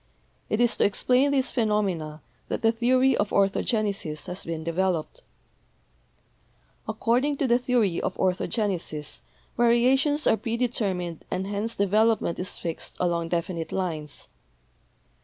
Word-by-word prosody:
It 215 Hz, -, 0 dB
is 240 Hz, -1 st, +3 dB
to -, -, +3 dB
explain 250 Hz, +7 st, +3 dB
these 275 Hz, -2 st, +1 dB
phenomena 195 Hz, -, -1 dB, 0.2 s
that -, -, -3 dB
the 225 Hz, -, +5 dB
theory 255 Hz, +3 st, +3 dB
of 205 Hz, -, 0 dB
'Orthogenesis' 200 Hz, -5 st, 0 dB
has 180 Hz, +1 st, -5 dB
been 165 Hz, -1 st, -4 dB
developed. 170 Hz, 0 st, -1 dB, 1.7 s
According 245 Hz, +6 st, +1 dB
to 280 Hz, -, 0 dB
the 240 Hz, 0 st, +4 dB
theory 240 Hz, -8 st, +1 dB
of 185 Hz, -, -2 dB
orthogenesis 185 Hz, -5 st, -2 dB, 0.3 s
variations 260 Hz, +5 st, +3 dB
are -, -, +4 dB
predetermined 210 Hz, -8 st, -2 dB
and 185 Hz, +1 st, -2 dB
hence 205 Hz, +3 st, -2 dB
development 210 Hz, -1 st, +2 dB
is 180 Hz, -, -4 dB
fixed 165 Hz, -1 st, -5 dB
along 170 Hz, -2 st, 0 dB
defi 175 Hz, +2 st, -1 dB
nite 165 Hz, -1 st, -5 dB
lines. 160 Hz, -6 st, -4 dB
205 Hz, 125 wpm, -26 LUFS, 175-240 Hz, 1.7 s, the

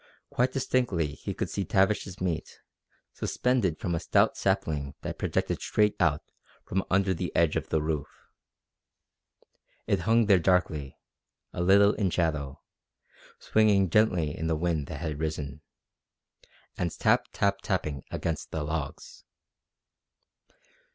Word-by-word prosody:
Quite 125 Hz, +1 st, +1 dB
distinctly 125 Hz, -, 0 dB
he -, -, -6 dB
could -, -, -2 dB
see 100 Hz, -, -3 dB
Tavish's 95 Hz, 0 st, +1 dB
meat, 85 Hz, -4 st, -3 dB, 0.6 s
suspended 120 Hz, -11 st, 0 dB
from 85 Hz, -, -3 dB
a 85 Hz, -, 0 dB
stout -, -, +2 dB
sapling 70 Hz, -3 st, -1 dB
that -, -, -5 dB
projected -, -, -1 dB
straight 105 Hz, -1 st, +2 dB
out 75 Hz, -1 st, +2 dB, 0.4 s
from 95 Hz, +1 st, -1 dB
under 95 Hz, 0 st, +2 dB
the 85 Hz, -, -3 dB
edge 85 Hz, -2 st, +3 dB
of 80 Hz, -1 st, -2 dB
the 80 Hz, -1 st, +1 dB
roof. 75 Hz, -2 st, -2 dB, 1.8 s
It 100 Hz, -, +1 dB
hung 115 Hz, +5 st, +3 dB
there 100 Hz, -3 st, +5 dB
darkly, 80 Hz, -6 st, 0 dB, 0.6 s
a 90 Hz, -, -3 dB
little 100 Hz, +3 st, +5 dB
in 100 Hz, -3 st, 0 dB
shadow, 75 Hz, -6 st, -2 dB, 0.7 s
swinging 100 Hz, -5 st, +3 dB
gently 90 Hz, -8 st, +2 dB
in 80 Hz, -, -3 dB
the 80 Hz, -, +1 dB
wind 80 Hz, -3 st, -1 dB
that 70 Hz, -2 st, -7 dB
had 75 Hz, -3 st, -3 dB
risen, 75 Hz, -2 st, -4 dB, 1.2 s
and 90 Hz, -, 0 dB
tap -, -, +3 dB
tap 100 Hz, 0 st, +1 dB
tapping 75 Hz, -8 st, -2 dB
against 80 Hz, -2 st, -3 dB
the 80 Hz, -, -3 dB
logs. 75 Hz, -1 st, -5 dB
85 Hz, 130 wpm, -28 LUFS, 75-100 Hz, 1.8 s, there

